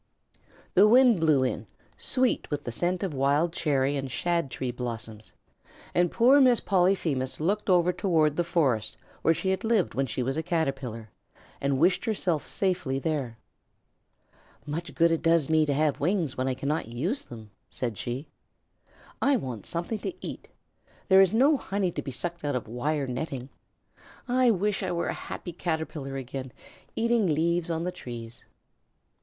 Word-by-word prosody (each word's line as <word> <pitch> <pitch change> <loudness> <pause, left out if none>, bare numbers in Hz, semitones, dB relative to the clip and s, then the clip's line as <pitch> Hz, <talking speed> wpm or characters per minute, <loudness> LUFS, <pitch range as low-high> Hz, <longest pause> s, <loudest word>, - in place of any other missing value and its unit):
The 200 +3 +7
wind 245 -2 +6
blew 155 -5 +3
in, 130 - -2 0.3
sweet 255 -1 0
with 145 -1 -3
the 120 - -4
scent 175 - -1
of 185 -5 -2
wild 145 +5 +1
cherry 140 -4 +1
and 135 -1 -4
shad 170 +2 -1
tree 130 -1 -3
blossoms, 115 -3 -6 0.6
and 175 0 +3
poor 260 +5 +5
Miss 250 -3 +5
Polyphemus 175 -9 +1
looked 200 +7 0
over 180 -1 +4
toward 160 -7 +2
the 175 - +1
forest 135 - 0 0.2
where 165 - +3
she 190 - -1
had 190 +1 -2
lived 220 -4 +1
when 135 0 0
she 125 +2 -2
was 135 +4 -2
a - - +1
Caterpillar, 135 - -3 0.5
and 140 -1 +1
wished 175 +6 +3
herself 185 -8 -1
safely 180 -9 0
there. 135 -6 -2 1.3
"Much 165 +3 -5
good 170 0 +4
it 165 - +1
does 165 -3 +3
me 155 -1 +4
to 145 - +1
have 150 -1 +1
wings 170 -3 0
when 130 +1 -1
I 130 - 0
cannot 140 0 -2
use 155 - -2
them," 110 -3 -11 0.2
said 120 -4 -3
she. 125 +7 -4 1.0
"I 280 - +4
want 125 - -6
something 175 +6 -3
to 345 - -4
eat. - - -7 0.6
There 190 0 +8
is 190 -2 +4
no 275 +6 +4
honey 195 -6 -1
to - - -4
be - - -6
sucked 170 +6 -5
out 145 -2 -1
of 125 - -3
wire 140 +6 -1
netting. 130 0 -4 0.8
I 250 0 +3
wish 205 -1 +1
I 185 -2 -2
were 170 -1 -1
a - - -1
happy 175 - -7
Caterpillar 160 -5 -3
again, 130 -1 -6 0.4
eating 230 -3 +2
leaves 170 +2 +1
on 165 0 -1
the 180 - -2
trees." 120 -5 -9
160 Hz, 170 wpm, -27 LUFS, 130-185 Hz, 1.3 s, There